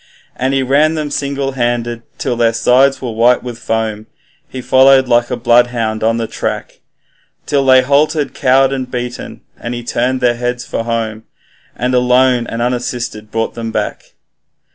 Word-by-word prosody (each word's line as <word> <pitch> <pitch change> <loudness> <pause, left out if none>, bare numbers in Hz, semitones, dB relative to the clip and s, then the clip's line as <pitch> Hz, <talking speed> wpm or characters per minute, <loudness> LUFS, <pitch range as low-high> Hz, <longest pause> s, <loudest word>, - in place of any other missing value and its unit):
And 130 +2 -1
he 135 - +1
ran 150 +5 +2
them 150 -2 -3
single 140 -1 -2
handed 120 -2 -2 0.2
till 120 - -2
their 115 -1 +2
sides 130 +4 +3
were 120 - -3
white 120 +2 +3
with 120 -2 -7
foam. 110 -2 -3 0.4
He 130 - -7
followed 130 +1 +4
like 120 -1 +2
a - - -2
bloodhound 120 -2 +1
on 115 +1 +2
their 115 - -2
track, - - -5 0.7
Till 140 -1 +1
they 130 -1 +6
halted 145 0 +1
cowed 135 0 +3
and 130 -2 -4
beaten, 125 -1 -6 0.2
then 120 - -4
he 120 0 -5
turned 125 +2 -1
their 125 -1 +2
heads 120 0 -3
for 115 - -4
home, 110 -1 -3 0.5
And 125 +2 -2
alone 125 -1 +3
and 115 +1 -3
unassisted 120 -3 -3
brought 115 +1 -2
them 115 -1 -5
back. - - -4
125 Hz, 165 wpm, -15 LUFS, 115-130 Hz, 0.7 s, they